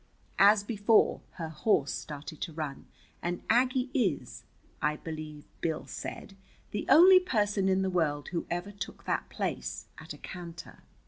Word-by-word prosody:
As 200 Hz, +1 st, +7 dB
before, 210 Hz, +1 st, +3 dB
her 165 Hz, -2 st, -5 dB
horse 150 Hz, -2 st, +1 dB
started 150 Hz, +1 st, -7 dB
to 165 Hz, -, -4 dB
run, 150 Hz, -3 st, -5 dB, 0.3 s
and 175 Hz, 0 st, -3 dB
Aggie 255 Hz, +2 st, +2 dB
is, 195 Hz, -, -1 dB, 0.4 s
I 150 Hz, 0 st, +1 dB
believe 155 Hz, -2 st, -7 dB, 0.2 s
Bill 160 Hz, -2 st, -2 dB
said, 195 Hz, -, -7 dB, 0.4 s
the 205 Hz, -, -3 dB
only 360 Hz, +6 st, +9 dB
person 210 Hz, -, +1 dB
in 190 Hz, 0 st, +2 dB
the 190 Hz, -, 0 dB
world 150 Hz, -5 st, 0 dB
who 175 Hz, -3 st, -3 dB
ever 175 Hz, +4 st, -3 dB
took 200 Hz, -1 st, -8 dB
that -, -, -1 dB
place -, -, -3 dB
at -, -, -10 dB
a -, -, -7 dB
canter. 170 Hz, -2 st, -9 dB
185 Hz, 150 wpm, -30 LUFS, 155-210 Hz, 0.4 s, only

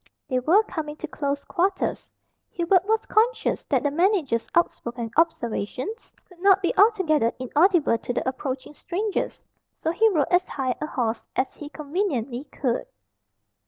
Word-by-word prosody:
They 255 Hz, -3 st, +1 dB
were 345 Hz, -, +4 dB
coming 310 Hz, -7 st, -5 dB
to 320 Hz, -, -6 dB
close 280 Hz, -2 st, -3 dB
quarters. 380 Hz, +1 st, -1 dB, 0.4 s
Hubert 355 Hz, +1 st, +2 dB
was 445 Hz, 0 st, +1 dB
conscious 450 Hz, +1 st, +1 dB
that -, -, +1 dB
the 290 Hz, -, +1 dB
manager's 330 Hz, -, +1 dB
outspoken 240 Hz, -8 st, 0 dB
observations 285 Hz, -, -1 dB, 0.2 s
could 360 Hz, -2 st, -19 dB
not 390 Hz, +1 st, +5 dB
be 350 Hz, -, +1 dB
altogether 375 Hz, -, +4 dB
inaudible 295 Hz, -, +3 dB
to -, -, -4 dB
the 245 Hz, -, -2 dB
approaching 260 Hz, +1 st, -4 dB
strangers. 395 Hz, +7 st, -3 dB, 0.2 s
So 320 Hz, -, -2 dB
he 445 Hz, +6 st, +4 dB
rode 310 Hz, -9 st, +2 dB
as 360 Hz, +1 st, +3 dB
high 260 Hz, -2 st, -1 dB
a 300 Hz, -, -2 dB
horse 235 Hz, -6 st, -2 dB
as 260 Hz, -, 0 dB
he 295 Hz, -, -9 dB
conveniently 285 Hz, -, -2 dB
could. 265 Hz, -, -2 dB
310 Hz, 150 wpm, -25 LUFS, 260-380 Hz, 0.4 s, not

